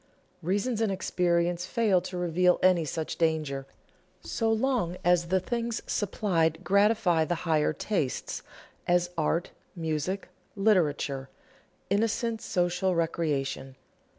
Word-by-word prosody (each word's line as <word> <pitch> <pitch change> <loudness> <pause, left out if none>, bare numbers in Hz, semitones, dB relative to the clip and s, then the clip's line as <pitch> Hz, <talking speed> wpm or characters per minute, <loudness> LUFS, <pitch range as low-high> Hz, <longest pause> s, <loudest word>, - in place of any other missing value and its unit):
Reason 205 +6 0
and 220 -3 +2
experience 175 -1 0
fail 205 -5 +2
to 180 0 -6
reveal 180 +1 +3
any 180 -3 +4
such 155 +1 -4
danger 155 -5 0 0.6
so 225 -1 0
long 225 -7 0
as 175 -1 +4
the 190 +2 +2
things 235 +3 -3
supplied 170 -5 0
gratify 200 -4 +3
the 175 +3 -1
higher 155 -2 +2
tastes 155 -4 -2 0.5
as 175 0 +2
art, 165 +2 0 0.2
music, 165 +3 -2 0.3
literature, 150 -10 +1 0.6
innocent 225 +2 0
social 180 +1 0
recreation. 145 -5 -1
175 Hz, 110 wpm, -28 LUFS, 160-200 Hz, 0.6 s, any